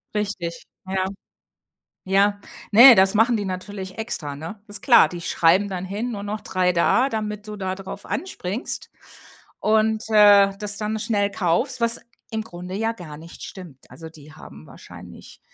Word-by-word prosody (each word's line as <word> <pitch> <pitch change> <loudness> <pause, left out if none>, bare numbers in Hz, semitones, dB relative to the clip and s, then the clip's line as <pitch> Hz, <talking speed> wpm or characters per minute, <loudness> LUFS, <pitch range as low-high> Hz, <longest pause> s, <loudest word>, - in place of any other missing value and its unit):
Richtig. 195 -5 -3 0.2
Ja. 190 0 -1 1.0
Ja. 200 +2 +2 0.3
Ne, 240 +4 +10
das 190 0 +4
machen 230 +3 +3
die 205 - -3
natürlich 190 0 -6
extra, 160 -11 -4
ne? 165 +8 -9
Ist 205 - -6
klar, 245 - +6
die 175 -1 -8
schreiben 175 +5 +2
dann 185 -2 -5
hin, 210 +6 -4
nur 200 - -6
noch 210 +1 -4
3 185 -1 0
da, 235 +9 +2
damit 210 -2 -4
du 210 - -6
da 190 -2 -3
drauf 195 +1 -9
anspringst 235 - -5 0.7
und, 220 0 +1
äh, 205 -2 +6
das 205 -1 -1
dann 215 +1 -3
schnell 210 -2 0
kaufst, 220 +8 -1
was 235 0 +2 0.3
im 220 -1 -3
Grunde 180 -3 -9
ja 225 +3 -1
gar 170 -9 -10
nicht 165 +2 -12
stimmt. 170 -9 -11
Also, 160 0 -11
die 155 -1 -16
haben 75 - -13
wahrscheinlich, - - -13
200 Hz, 160 wpm, -22 LUFS, 180-215 Hz, 1.0 s, Ne